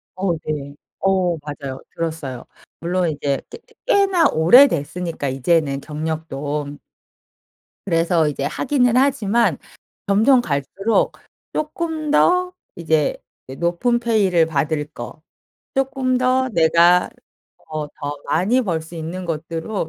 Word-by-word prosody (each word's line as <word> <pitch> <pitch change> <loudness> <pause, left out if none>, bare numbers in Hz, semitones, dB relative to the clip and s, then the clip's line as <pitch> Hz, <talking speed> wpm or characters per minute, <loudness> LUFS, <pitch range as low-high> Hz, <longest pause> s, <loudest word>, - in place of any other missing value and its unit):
어 185 -2 0
네. 145 -2 -4 0.2
어 185 -3 +1
맞아요. 145 -3 -7
들었어요. 155 -7 -4 0.4
물론 175 0 0
이제 140 -2 -2
꽤 - - -9
꽤 465 - -24
꽤나 395 -7 +4
오래됐으니까 170 - +3
이제는 140 +1 +1
경력도 150 -2 -4 1.1
그래서 165 -2 +2
이제 145 -2 -3
하기는 250 - +1
하지만 240 -4 +2 0.5
점점 225 +6 +4
갈수록 170 - 0 0.4
쪼끔 310 0 -3
더 360 +3 +3 0.2
이제 160 -3 0 0.3
이 130 - -8
높은 175 - 0
페이를 200 -8 +2
받을 150 -1 -1
거, 120 +5 -8 0.5
쪼끔 265 -1 0
더 255 +1 +2
내가 170 0 +4 0.6
어 155 -1 -4
더 145 0 -6
많이 220 +10 +2
벌 170 -6 -2
수 160 +2 -12
있는 170 +3 -5
것들로 165 +3 -3
170 Hz, 230 characters per minute, -20 LUFS, 150-240 Hz, 1.1 s, 꽤나